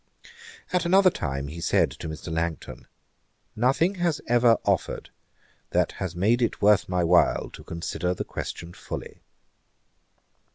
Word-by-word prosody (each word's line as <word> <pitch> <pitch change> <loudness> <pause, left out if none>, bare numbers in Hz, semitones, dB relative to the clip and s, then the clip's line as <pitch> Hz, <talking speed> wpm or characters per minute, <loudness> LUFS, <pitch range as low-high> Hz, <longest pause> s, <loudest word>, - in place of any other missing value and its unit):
At 180 -2 +2
another 185 +2 +5
time 70 - -3
he 80 +3 -7
said - - +2
to 80 - -7
Mr. 80 +1 -6
Langton, 80 -1 -4 0.7
'Nothing 135 - +2
has 170 -4 +1
ever 120 -1 +4
offered, - - -1 0.6
that - - +1
has 90 -2 -3
made 110 +7 +2
it 120 - 0
worth 105 -2 +4
my 90 -1 +1
while 85 +1 +3
to - - -11
consider 90 +2 -3
the - - -3
question 85 0 -6
fully.' - - -8
90 Hz, 135 wpm, -26 LUFS, 85-125 Hz, 0.7 s, another